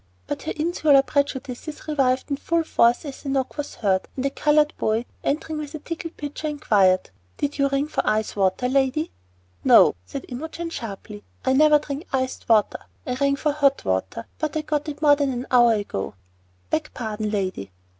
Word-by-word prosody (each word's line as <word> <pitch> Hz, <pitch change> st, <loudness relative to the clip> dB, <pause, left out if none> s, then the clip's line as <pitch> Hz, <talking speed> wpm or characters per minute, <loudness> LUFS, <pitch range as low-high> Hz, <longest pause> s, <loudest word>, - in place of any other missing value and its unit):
But -, -, -4 dB
her -, -, -3 dB
insular 305 Hz, -3 st, +3 dB
prejudices 280 Hz, +1 st, -3 dB
revived 270 Hz, -2 st, +1 dB
in 280 Hz, -, 0 dB
full 335 Hz, +3 st, 0 dB
force 240 Hz, -3 st, +3 dB
as 280 Hz, -2 st, -8 dB
a 280 Hz, -, -4 dB
knock 270 Hz, -1 st, -1 dB
was 295 Hz, -1 st, -5 dB
heard, 190 Hz, -3 st, 0 dB
and 260 Hz, -, -3 dB
a 275 Hz, -, +1 dB
colored 300 Hz, +1 st, +3 dB
boy, 220 Hz, +2 st, 0 dB, 0.2 s
entering 305 Hz, +1 st, -1 dB
with 300 Hz, 0 st, -6 dB
a -, -, -3 dB
tinkling 330 Hz, +2 st, -6 dB
pitcher, 295 Hz, +1 st, -5 dB
inquired, 200 Hz, -, +2 dB, 0.3 s
"Did 290 Hz, 0 st, -2 dB
you 275 Hz, 0 st, +3 dB
ring 275 Hz, +1 st, 0 dB
for -, -, -1 dB
ice 215 Hz, 0 st, 0 dB
water, 195 Hz, +5 st, +1 dB
lady?" 270 Hz, +4 st, +1 dB, 0.5 s
"No!" -, -, +7 dB
said 275 Hz, -, -6 dB
Imogen 320 Hz, +6 st, -6 dB
sharply; 195 Hz, -, -7 dB, 0.2 s
"I 260 Hz, -, +3 dB
never 300 Hz, +2 st, +6 dB
drink 295 Hz, +3 st, -6 dB
iced 260 Hz, -2 st, -2 dB
water. 215 Hz, -2 st, +3 dB, 0.3 s
I 250 Hz, -, -2 dB
rang 280 Hz, +2 st, +1 dB
for 300 Hz, +1 st, 0 dB
hot 280 Hz, -2 st, +2 dB
water, 95 Hz, +4 st, -2 dB
but 310 Hz, -1 st, -2 dB
I -, -, 0 dB
got 300 Hz, 0 st, -2 dB
it 295 Hz, +1 st, -7 dB
more 290 Hz, -1 st, +7 dB
than 285 Hz, -2 st, 0 dB
an 250 Hz, 0 st, -4 dB
hour 240 Hz, -2 st, +6 dB
ago." 200 Hz, -, -3 dB, 0.6 s
"Beg -, -, 0 dB
pardon, 215 Hz, -2 st, -3 dB
lady." 190 Hz, -, -2 dB
275 Hz, 185 wpm, -23 LUFS, 230-300 Hz, 0.6 s, No